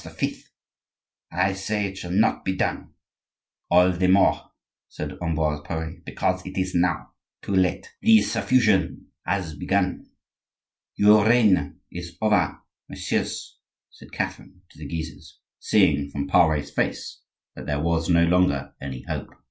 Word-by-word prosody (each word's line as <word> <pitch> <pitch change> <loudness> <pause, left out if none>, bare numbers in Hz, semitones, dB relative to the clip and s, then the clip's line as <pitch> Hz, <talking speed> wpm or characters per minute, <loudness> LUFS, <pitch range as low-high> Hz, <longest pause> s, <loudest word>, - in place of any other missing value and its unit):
I 95 +2 +1
say 105 +2 -2
it 95 -1 -5
shall 90 -2 -7
not 105 +5 +2
be 95 - -1
done—" - - -3 0.7
"All 90 +1 +5
the 90 +1 0
more," 95 +2 +3 0.4
said - - -6
Ambroise 80 -3 -1
Pare; 80 +1 -5
"because 95 0 -2
it 95 +1 -8
is 95 0 -1
now 90 0 0 0.3
too 100 - -3
late; 95 -1 +1
the 225 0 +6
suffusion 110 -9 +1 0.2
has 90 -6 -2
begun." 95 +4 -1 0.9
"Your 105 +1 +6
reign 105 -11 +3
is 85 -1 -8
over, 110 -1 +1 0.3
messieurs," - - -3 0.3
said - - -16
Catherine 90 -1 -5
to - - -18
the 75 - -7
Guises, 80 +1 -7 0.2
seeing 75 -9 +2
from 70 0 -3
Pare's 75 -4 +3
face - - -3 0.3
that - - -9
there 75 -1 -1
was 80 +1 0
no 85 -1 +5
longer 85 -6 +1
any 65 -2 -6
hope. - - -5
90 Hz, 135 wpm, -24 LUFS, 80-95 Hz, 0.9 s, the